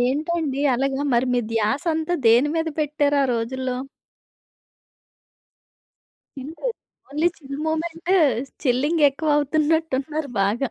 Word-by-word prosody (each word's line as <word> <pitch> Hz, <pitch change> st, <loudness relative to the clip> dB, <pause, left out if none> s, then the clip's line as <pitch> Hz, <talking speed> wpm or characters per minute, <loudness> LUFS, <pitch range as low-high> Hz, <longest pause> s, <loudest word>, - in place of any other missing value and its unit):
ఏంటండి 290 Hz, +2 st, 0 dB
అలగా? 270 Hz, +2 st, -1 dB
మరి 250 Hz, +2 st, +2 dB
మీ 245 Hz, -, +2 dB
ధ్యాసంతా 315 Hz, +10 st, 0 dB
దేని 245 Hz, +6 st, +5 dB
మీద 325 Hz, 0 st, 0 dB
పెట్టారు 290 Hz, -1 st, +1 dB
ఆ -, -, +2 dB
రోజుల్లో? 255 Hz, +2 st, -2 dB, 2.6 s
Chill. 270 Hz, +2 st, -7 dB, 0.6 s
Only 310 Hz, +4 st, +2 dB
chill 275 Hz, -2 st, -8 dB
moment 330 Hz, +2 st, -3 dB, 0.5 s
chilling 290 Hz, +6 st, +1 dB
ఎక్కువ 300 Hz, +3 st, -2 dB
అవుతున్నట్టున్నారు 305 Hz, -1 st, 0 dB
బాగా. 220 Hz, +6 st, 0 dB
285 Hz, 100 wpm, -23 LUFS, 260-315 Hz, 2.6 s, దేని